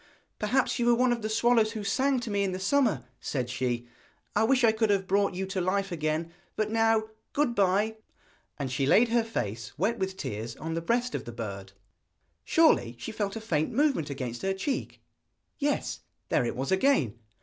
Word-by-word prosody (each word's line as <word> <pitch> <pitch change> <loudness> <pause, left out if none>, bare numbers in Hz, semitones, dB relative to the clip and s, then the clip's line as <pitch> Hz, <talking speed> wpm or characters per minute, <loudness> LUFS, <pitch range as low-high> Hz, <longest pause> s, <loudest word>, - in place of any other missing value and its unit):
'Perhaps 245 +5 +1
you 240 - +1
were 240 - +6
one 250 +1 +3
of 240 -1 -1
the 215 - -2
swallows 225 0 +3
who 215 -2 -4
sang 260 +6 +1
to 235 -3 -5
me 200 0 +1
in 190 -2 -1
the 185 - -4
summer,' 200 - +2 0.2
said 125 -3 -3
she. 125 -2 -2 0.5
'I - - +4
wish 260 +1 +3
I 225 - +7
could 220 0 +1
have 195 -2 +2
brought 195 0 +1
you 190 +1 -2
to 190 -1 -2
life 195 +2 0
again; 160 0 -2 0.2
but 215 0 -1
now, 225 -1 +3 0.3
good 285 -4 +1
bye!' 205 +2 +2 0.6
And 135 -3 -3
she 135 +1 0
laid 225 +10 +5
her 235 0 +3
face, 110 - -4
wet 215 +8 0
with 190 0 -2
tears, 115 - -5
on 160 +1 -5
the 165 - -2
breast 240 +7 0
of - - -3
the 120 - -6
bird. 100 -4 -6 0.7
Surely 315 - +3
she 125 - -6
felt 205 -2 -2
a - - -3
faint 160 -8 0
movement 270 - +2
against 130 -4 -4
her 195 0 0
cheek? 260 +8 -3 0.6
Yes, 290 0 -1 0.3
there - - +2
it - - -3
was 135 +6 -3
again! 190 - +2
195 Hz, 200 wpm, -28 LUFS, 145-230 Hz, 0.7 s, I